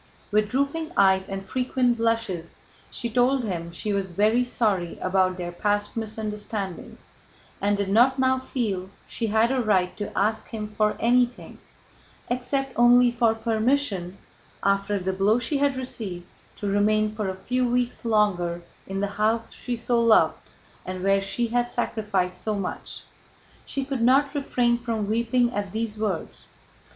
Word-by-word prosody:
With 210 0 +2
drooping 285 +6 -1
eyes 190 0 +4
and 195 0 -5
frequent 250 +2 +1
blushes 225 -7 -1 0.3
she 240 - -2
told 250 +3 +2
him 170 -6 -3
she 210 +4 -3
was 195 -1 -1
very 215 +7 +2
sorry 210 -8 0
about 185 0 +1
their 175 -1 -4
past 205 +3 -1
misunderstandings 210 -3 -5 0.5
and 205 0 +2
did 200 -1 -1
not 245 +6 +4
now 260 0 +2
feel 210 -8 -3 0.2
she 230 - -3
had 220 +3 +3
a 265 -1 +1
right 190 -5 +1
to 205 - -4
ask 215 +3 +1
him 215 -2 -5
for 210 0 0
anything, 245 +1 +1 0.7
except 265 +2 -1
only 240 +1 +6
for 235 -2 +2
permission, 220 -4 0 0.5
after 200 +1 +1
the 190 0 -2
blow 200 +4 +3
she 250 +4 -1
had 280 -2 +1
received, 205 -9 -4 0.3
to 205 - -5
remain 215 +1 +2
for 210 -3 -2
a 190 - -4
few 250 +6 -1
weeks 245 0 -1
longer 185 -6 +1 0.2
in 195 0 -3
the - - +2 0.2
house 225 +1 +1
she 245 - -4
so 235 +1 0
loved 230 -1 +4 0.4
and 185 0 -5
where 195 0 +3
she 230 +4 -2
had 240 +1 0
sacrificed 200 -7 -1
so 215 -1 -1
much. 195 -2 -5 0.6
She 275 -1 -2
could 270 -3 -3
not 275 +4 +4
refrain 245 -4 +1
from 225 -4 -2
weeping 235 +2 +1
at 200 -2 -3
these 220 0 -3
words. 200 -6 -3
220 Hz, 155 wpm, -25 LUFS, 195-245 Hz, 0.7 s, only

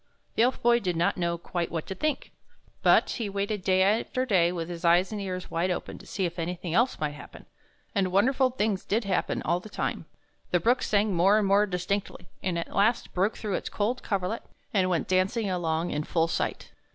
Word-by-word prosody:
The - - +1
Elf 250 +2 +2
Boy 240 0 +5
did 180 -5 -2
not 170 +1 +1
know 170 -1 -1
quite 170 0 -3
what 165 -1 -3
to - - -5
think, 305 +10 -2 0.5
but - - +5
he 225 -5 -3
waited 200 +1 -2
day 185 +1 +3
after 225 +5 +1
day 180 -7 +3
with 170 -2 -4
his 175 -1 -7
eyes 175 +3 +4
and 210 -1 -4
ears 185 -2 -5
wide 170 +3 0
open 180 - -4
to - - -14
see 190 - -1
if 170 0 -4
anything 175 0 -3
else 235 +7 +2
might 150 -1 -1
happen; 145 - -12 0.5
and 190 -3 +1
won 200 +3 +4
derful 265 0 +3
things 215 -6 -1
did 225 +4 0
happen 195 -2 -1
all 170 +2 +1
the 215 - -11
time. - - -3 0.4
The 175 - +2
brook 240 +7 +2
sang 205 -1 +1
more 190 +5 +4
and 215 - +2
more 200 +2 +4
distinctly, 180 0 -3
and 180 -3 -1
at 170 - -5
last 220 +4 +2
broke 195 +4 +1
through 210 -3 -3
its - - -2
cold 230 +5 -1
coverlet 200 +2 -2 0.3
and 185 -3 +2
went 175 -3 0
dancing 190 +3 +1
along 170 -1 -1
in 150 - -1
full 165 +1 +1
sight. - - -3
190 Hz, 215 wpm, -27 LUFS, 175-210 Hz, 0.5 s, Boy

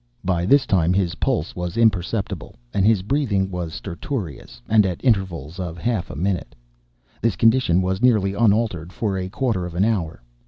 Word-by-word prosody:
By 90 -1 0
this 140 +3 +5
time 90 -2 +2
his 95 -3 +1
pulse 80 - 0
was 90 +3 -4
imperceptible 105 -2 0 0.2
and 95 - +1
his 110 -5 +3
breathing 105 -6 0
was 90 -3 -4
stertorous, 85 - -6
and 110 -1 +5
at 90 -3 -2
intervals 95 - 0
of 85 -2 -4
half 110 +1 -1
a - - -7
minute. 90 0 -2 0.7
This 115 -4 +1
condition 115 -4 +3
was 95 +2 -1
nearly 105 -6 +3
unaltered 105 -6 +1
for 100 0 -2
a 95 -1 -3
quarter 110 -3 -1
of 85 - -9
an 95 +4 +2
hour. 85 - -2
95 Hz, 170 wpm, -22 LUFS, 85-110 Hz, 0.7 s, this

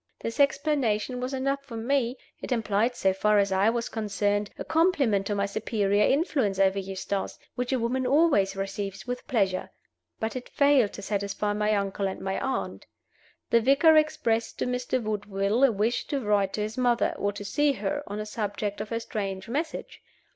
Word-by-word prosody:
This 230 - -5
explanation 270 -5 +1
was 255 +1 -3
enough 275 +1 -1
for 235 -5 -8
me; 250 +1 0 0.2
it - - -6
implied, 225 0 +1
so 190 -5 +2
far 210 +2 +2
as 200 -1 +2
I 190 +3 +3
was 230 0 -1
concerned, 205 -1 -1
a - - -5
compliment 280 - +2
to 205 - -1
my 200 0 +1
superior 205 -1 0
influence 270 - +1
over 195 0 +3
Eustace, 195 +1 -4 0.2
which 250 +1 -3
a 260 - +2
woman 250 +2 -1
always 265 -10 +3
receives 195 0 -4
with 245 0 -5
pleasure. 195 -6 0 0.5
But 220 +2 -2
it 255 - -6
failed 280 -7 +3
to 200 - -8
satisfy 200 0 -1
my 210 0 +1
uncle 200 0 -1
and 190 - -5
my 190 0 -2
aunt. 265 -1 -3 0.6
The 230 - +5
vicar 280 +6 +5
expressed 230 -7 +1
to - - -1
Mr. 250 0 -1
Woodville 210 +2 0
a 270 - +6
wish 220 +3 0
to 285 -2 -1
write 205 -4 +1
to 210 - -2
his 215 +4 -3
mother, 245 -1 +2
or 205 - 0
to 205 0 -7
see 290 +7 +2
her, 290 +3 -2
on 205 - -5
the 215 - -3
subject 205 -1 -3
of 215 - -6
her 230 - -1
strange 195 -3 -4
message. 300 +7 -4
220 Hz, 185 wpm, -27 LUFS, 200-255 Hz, 0.6 s, a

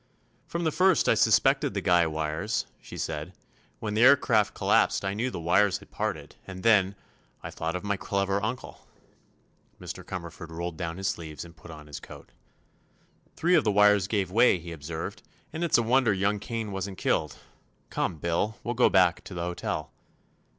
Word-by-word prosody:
"From 170 0 -3
the 160 - +1
first 185 +2 +3
I - - +6
suspected - - +3
the - - +1
guy 85 -2 +4
wires," 80 +7 -2 0.2
she - - -10
said. 80 +3 -4 0.4
"When 105 - -4
the 110 - +1
aircraft 120 -5 +5
collapsed - - +2
I 95 - -1
knew 115 +5 -1
the 125 - -6
wires 95 +4 +3
had - - -17
parted, - - -4
and 95 -1 -8
then—I 100 - 0
thought 80 +2 -3
of 90 - -4
my 100 -1 -1
clever 100 0 -1
uncle." 125 +4 -5 0.9
Mr. - - -7
Cumberford 85 - -7
rolled 85 +1 -5
down 85 0 -4
his 95 0 -2
sleeves 80 -1 -5
and 85 0 -14
put 85 - -14
on 75 -2 -10
his 75 -2 -8
coat. - - -13 1.0
"Three 175 +2 +1
of - - +5
the 105 - +2
wires 105 -1 +5
gave 100 -3 -1
way," 115 -1 +5
he 85 0 -9
observed, 85 +7 -6 0.3
"and 165 +2 -3
it's 170 - +3
a 120 - +2
wonder 125 0 +3
young 100 +2 0
Kane 110 0 -4
wasn't 95 0 -4
killed. - - 0 0.6
Come, - - -1
'Bil; 85 +7 -1
we'll 120 - -2
go 125 +1 +4
back 90 -2 +3
to 95 - -8
the 85 - -3
hotel." 90 0 -4
95 Hz, 180 wpm, -27 LUFS, 85-110 Hz, 1.0 s, I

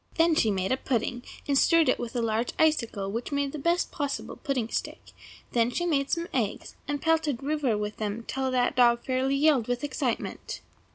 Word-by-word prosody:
Then 330 0 +4
she 230 -8 +3
made 190 0 0
a 260 - +2
pudding, 245 -1 -1 0.3
and 285 - +2
stirred 330 +3 +5
it - - +2
with 240 0 -5
a 240 - 0
large 225 +1 0
icicle, 230 -11 +1
which 230 +6 -4
made 280 -1 0
the 305 - -6
best 340 +4 +1
possible 285 -3 -3
pudding 265 -6 -2
stick; - - -4 0.4
then 235 -1 +2
she 345 +8 -2
made 280 -5 +1
some 335 0 -1
eggs, 225 -6 -2
and 290 0 -1
pelted 315 -5 +1
Rover 280 -6 0
with 210 0 -4
them 215 +1 -3
till 265 +2 -2
that 250 -1 +2
good - - -21
dog 235 -1 +4
fairly 265 +1 +1
yelled 280 -5 +3
with 245 +2 -2
excitement. 260 -4 -3
260 Hz, 205 wpm, -27 LUFS, 235-295 Hz, 0.4 s, stirred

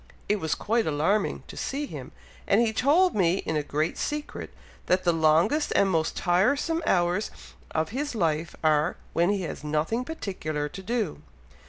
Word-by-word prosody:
it 210 0 +1
was 160 -4 -1
quite 225 -1 0
alarming 160 +8 +1
to - - -11
see 285 +2 -3
him, - - -8 0.4
and - - +4
he 230 -2 +2
told 320 +10 +4
me 180 -3 +3
in 160 - -1
a 150 - +2
great 150 +2 -2
secret, 295 0 -4 0.4
that 185 +1 +2
the 175 - +3
longest 165 - +3
and 195 -1 +4
most 160 -2 0
tiresome 280 - +2
hours 175 +3 +2 0.4
of 160 0 -1
his 275 +4 -3
life 165 -4 0
are, 155 +1 +2 0.2
when 170 +2 +3
he 200 -2 0
has 160 - -6
nothing 155 +11 0
particular 170 - -4
to 190 - -9
do." 210 -7 -2
185 Hz, 170 wpm, -27 LUFS, 160-235 Hz, 0.4 s, and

